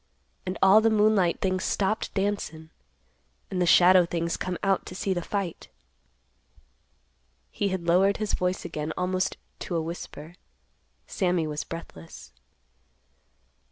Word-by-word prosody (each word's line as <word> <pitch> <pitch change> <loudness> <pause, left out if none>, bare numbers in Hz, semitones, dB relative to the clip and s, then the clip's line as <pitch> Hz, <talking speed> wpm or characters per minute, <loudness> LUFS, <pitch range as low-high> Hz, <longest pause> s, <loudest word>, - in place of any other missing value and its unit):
And 185 - -3
all 195 +3 +7
the 225 - +3
moonlight 210 -5 +2
things 185 -1 0
stopped 205 +2 -1
dancin', 195 -6 -3 0.8
and 185 -2 -1
the 175 - +2
shadow 180 +1 +7
things 170 0 -2
come 180 -1 -3
out 195 -1 +2
to 180 - -8
see 195 0 -1
the 175 - -2
fight." 190 -2 -4 1.8
He 205 - -1
had 185 -3 -3
lowered 190 +4 +3
his 215 -1 -2
voice 180 0 -1
again 155 +1 -4
almost 185 +1 -1 0.2
to 175 - -4
a 165 - +1
whisper. 165 -1 -8 0.7
Sammy 180 -3 0
was 150 -1 -3
breathless. 85 - -10
180 Hz, 130 wpm, -26 LUFS, 170-195 Hz, 1.8 s, all